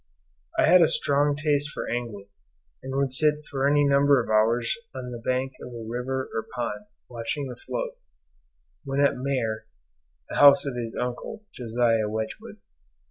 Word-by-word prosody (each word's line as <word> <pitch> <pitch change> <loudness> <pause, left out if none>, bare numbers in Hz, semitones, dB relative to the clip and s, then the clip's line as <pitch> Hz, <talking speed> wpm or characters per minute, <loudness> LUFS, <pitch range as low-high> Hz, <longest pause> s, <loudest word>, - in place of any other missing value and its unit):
I - - +5
had 180 +3 +7
a 165 - +6
strong 145 0 +2
taste 145 0 +1
for - - -5
angling, 115 -5 -4 0.6
and 130 0 -6
would 135 -1 0
sit 150 +2 +2
for 135 0 +1
any 145 0 +4
number 140 0 +4
of 115 -2 -3
hours 115 +2 +2 0.2
on 125 -1 -6
the 120 - -6
bank 130 +2 -1
of 125 - -8
a 115 -2 -8
river 130 +3 -3
or 110 - -3
pond 105 -4 -4 0.2
watching 120 +4 -4
the 125 - -7
float; - - -5 0.8
when 135 -1 -2
at 140 0 +4
Maer 120 -5 -2 0.6
(The - - -5
house 140 0 +7
of 140 -3 -3
his 115 -2 -5
uncle, 125 - -4
Josiah 115 -2 +1
Wedgwood.) 110 +1 -5
130 Hz, 165 wpm, -26 LUFS, 115-140 Hz, 0.8 s, had